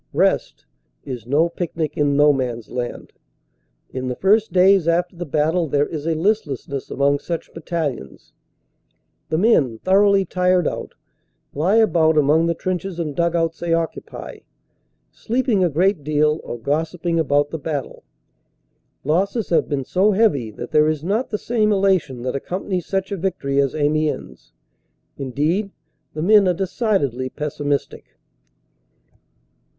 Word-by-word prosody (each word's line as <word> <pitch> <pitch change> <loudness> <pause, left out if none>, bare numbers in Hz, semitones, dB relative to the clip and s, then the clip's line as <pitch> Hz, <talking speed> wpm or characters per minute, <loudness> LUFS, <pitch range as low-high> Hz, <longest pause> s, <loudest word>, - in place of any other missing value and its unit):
"Rest" - - 0 0.4
is 125 -4 -7
no 150 +6 +3
picnic 165 -3 -4
in 145 -1 +1
No 145 0 +6
Man 125 -3 -2
s 115 - -13
Land. 125 -1 -5 0.8
In 130 0 -4
the 125 - -2
first 210 - +2
days 190 -1 +4
after 175 +2 +1
the 175 -1 -6
battle 160 +4 +1
there 145 0 +1
is 155 0 -5
a 165 - +1
listlessness 155 - -2
among 140 +1 +1
such 170 +2 -5
battalions. 155 - -5 1.0
The 155 - 0
men, 155 - +3
thoroughly 195 +1 +4
tired 180 0 +1
out, - - -5 0.6
lie 170 +9 +1
about 165 -8 +3
among 150 +3 +3
the 170 - 0
trenches 185 +1 -3
and 155 -4 -3
dug 170 0 +1
outs 165 -1 0
they 170 -1 +1
occupy, 165 -1 -5 0.7
sleeping 235 -4 0
a 175 - +3
great 175 +2 +1
deal 150 +1 +1
or 120 - -6
gossiping 160 +6 -1
about 145 -1 +1
the 160 - -4
battle. 145 -3 -4 1.0
Losses 195 - 0
have 170 - +2
been 140 -3 -2
so 195 +7 +2
heavy 190 - +2
that 105 - -8
there 150 0 +4
is 155 -1 -1
not 210 +8 -1
the 210 - -2
same 215 -1 0
elation 190 -11 +1
that 130 +1 -2
accompanies 180 +4 -3
such 195 0 -2
a 200 - -2
victory 160 -7 0
as 140 0 -1
Amiens. 150 - -2 0.7
Indeed, 150 - -1 0.5
the 155 - -2
men 205 +1 +5
are 180 - +2
decidedly 180 - -1
pessimistic. 145 0 -4
165 Hz, 145 wpm, -21 LUFS, 145-185 Hz, 1.0 s, No